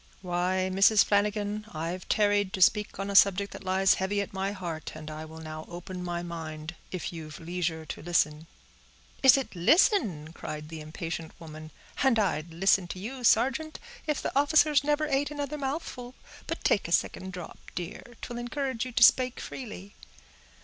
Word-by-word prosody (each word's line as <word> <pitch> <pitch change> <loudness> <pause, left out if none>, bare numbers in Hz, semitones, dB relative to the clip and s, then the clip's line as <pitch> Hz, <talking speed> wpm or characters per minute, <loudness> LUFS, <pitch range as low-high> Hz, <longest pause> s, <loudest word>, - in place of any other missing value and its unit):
"Why, 185 +1 0
Mrs. 195 +2 +6
Flanagan, 210 +1 0
I've 170 +4 -4
tarried 205 -2 +2
to 190 - -3
speak 210 +2 +2
on 195 +1 -3
a - - -4
subject 200 0 +5
that - - -9
lies 190 +1 +3
heavy 200 +2 0
at 200 - -3
my 190 +1 -1
heart, 170 -6 -6
and 155 0 -8
I 155 +1 -6
will 160 0 -11
now 155 -1 -7
open 180 +1 -7
my 175 -1 -3
mind, 160 -1 -6 0.2
if 185 -1 -4
you've 155 -2 -8
leisure 165 -1 -3
to - - -7
listen." 160 -2 0 0.7
"Is 265 -1 +8
it 270 -7 -4
listen?" 175 - +3
cried 150 -2 -7
the 160 -1 -7
impatient 160 +2 -6
woman; 155 -1 -9 0.3
"and 265 -3 +4
I'd 170 -6 0
listen 190 +2 +3
to 180 - -6
you, 250 +6 -6
sargeant, 270 +8 +2 0.3
if 300 -2 -1
the - - -3
officers 290 +1 +4
never 295 +1 +1
ate 285 -1 0
another 295 0 -4
mouthful. 265 -3 -4 0.3
But - - -4
take 200 - +2
a - - -8
second 190 +2 0
drop, 180 -3 -8 0.2
dear; 175 -1 -5 0.2
'twill 240 -1 -5
encourage 255 -1 -2
you 255 - -6
to 235 - +4
spake 255 +2 +5
freely." 210 -5 -8
190 Hz, 175 wpm, -28 LUFS, 165-240 Hz, 0.7 s, Is